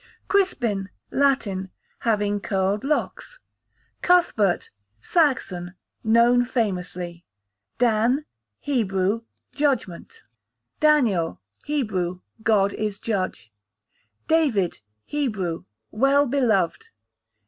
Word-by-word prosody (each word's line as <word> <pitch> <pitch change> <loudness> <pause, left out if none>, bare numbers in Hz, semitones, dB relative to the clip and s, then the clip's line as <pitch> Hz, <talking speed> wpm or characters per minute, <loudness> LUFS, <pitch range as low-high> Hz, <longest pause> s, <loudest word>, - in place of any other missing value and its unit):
Crispin, 235 - +1 0.2
Latin, 225 -9 +1 0.3
having 205 -2 +1
curled 195 +1 0
locks. 300 - -2 0.6
Cuthbert, 340 - +2 0.3
Saxon, 190 - 0 0.3
known 235 +2 +5
famously. 180 -7 -3 0.5
Dan, 240 +4 +2 0.3
Hebrew, 210 -5 0 0.3
judgment. 265 - -2 0.6
Daniel, 225 - +3 0.3
Hebrew, 190 -11 -1 0.2
God 200 -3 +3
is 210 -2 -3
judge. 185 - -3 0.7
David, 250 - +2 0.2
Hebrew, 210 - -2 0.3
well 275 +5 +3
beloved. 230 - +1
220 Hz, 70 wpm, -24 LUFS, 190-275 Hz, 0.7 s, known